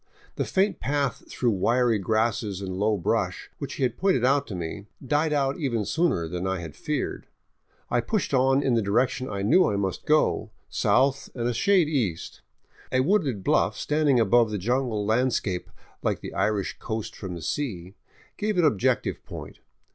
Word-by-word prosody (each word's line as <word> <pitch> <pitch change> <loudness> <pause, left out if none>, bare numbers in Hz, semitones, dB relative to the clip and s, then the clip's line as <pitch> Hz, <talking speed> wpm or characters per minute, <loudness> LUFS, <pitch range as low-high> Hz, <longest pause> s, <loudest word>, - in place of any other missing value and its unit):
The - - -1
faint 190 -1 +1
path 140 -2 -2
through 120 -2 +1
wiry 115 +3 +2
grasses 110 0 0
and 95 -2 -5
low 105 +2 +1
brush, 85 - -1
which - - -5
he - - -2
had 125 - 0
pointed 185 -11 +2
out 140 +2 +2
to 100 - -5
me, 90 +4 -5 0.2
died 150 +4 +1
out 140 0 0
even 120 -8 -1
sooner 160 - +1
than 90 +3 -3
I 95 0 0
had 80 -4 -8
feared. 150 -3 -3 0.6
I 120 - +2
pushed 200 - -2
on 135 +1 +3
in 130 - +2
the 115 - +3
direction 125 +5 0
I 100 -1 -3
knew 175 - +5
I 105 - -1
must 95 -2 -3
go, 155 0 +2
— - - -42
south 135 +1 +2
and 120 -2 -1
a 120 - 0
shade 190 - +3
east. 115 - -2 0.5
A 130 - +3
wooded 140 - +1
bluff - - +2
standing 150 -4 +2
above 115 +1 +4
the 105 - -2
jungle 115 0 0
landscape, 110 -5 0 0.3
like - - -1
the - - -7
Irish 105 -3 -1
coast 110 -1 -4
from 95 -3 -6
the 85 - -7
sea, 95 - -3 0.4
gave 210 -2 -1
an 175 - +4
objective 110 -11 +1
point. - - -9
120 Hz, 180 wpm, -26 LUFS, 100-140 Hz, 0.6 s, knew